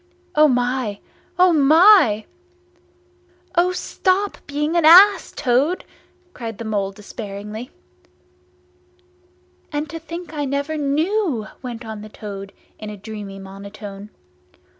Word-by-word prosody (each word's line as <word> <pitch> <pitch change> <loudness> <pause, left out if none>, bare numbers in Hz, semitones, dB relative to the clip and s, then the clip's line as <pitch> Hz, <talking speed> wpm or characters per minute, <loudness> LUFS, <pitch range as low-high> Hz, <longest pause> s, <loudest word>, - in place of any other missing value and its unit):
O 305 -3 +6
my! 245 -4 0 0.4
O 365 -1 +5
my!" 310 - +6 1.3
"O 355 +1 +3
stop 380 +2 -1
being 300 +3 -2
an 340 - +3
ass, 365 +3 +7
Toad!" 270 +9 0 0.5
cried 225 -3 -7
the 230 - -7
Mole 200 -3 -1
despairingly. 210 +2 -8 2.0
"And 295 +1 -2
to 330 - -6
think 335 0 -8
I 295 -2 -2
never 280 +3 -2
knew!" 305 - 0 0.2
went 245 -2 -7
on 220 -1 -7
the 215 - -10
Toad 200 -2 -8 0.3
in 215 - -7
a 210 - -8
dreamy 205 -1 -8
monotone. 200 +1 -10
255 Hz, 115 wpm, -21 LUFS, 210-325 Hz, 2.0 s, ass